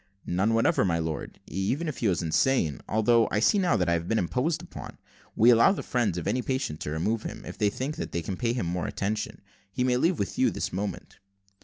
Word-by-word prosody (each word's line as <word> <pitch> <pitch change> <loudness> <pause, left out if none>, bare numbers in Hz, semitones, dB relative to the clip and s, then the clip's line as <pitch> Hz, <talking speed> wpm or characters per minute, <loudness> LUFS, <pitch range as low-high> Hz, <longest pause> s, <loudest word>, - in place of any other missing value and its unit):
"None 100 +6 +1
whatever, 115 - +3
my 85 -4 +1
lord, 80 -3 -4
even 125 - -2
if 155 - -4
he 115 - +1
were 95 - +3
insane; 80 - +1
although 115 +1 +3
I 105 - +1
see 200 - +4
now 180 -11 +2
how 90 - +2
I - - +2
have 85 0 -1
been 115 - +1
imposed 125 - 0
upon. - - -9 0.4
We 120 +3 +6
allow 115 +10 +6
the - - -5
friends 115 -8 0
of 85 - -4
any 125 - +1
patient 130 - -2
to - - -4
remove 105 +9 -1
him, - - -7
if - - -9
they 105 - +3
think 135 +8 -4
that - - -4
they 85 - -2
can 95 - -3
pay 115 +3 0
him 120 -7 -2
more 90 +1 -2
attention. 105 +2 -3 0.3
He 125 +4 -1
may 125 -1 +2
leave 165 +6 +2
with 100 - -3
you - - +4
this - - -4
moment." 100 0 -5
110 Hz, 235 wpm, -27 LUFS, 90-125 Hz, 0.4 s, We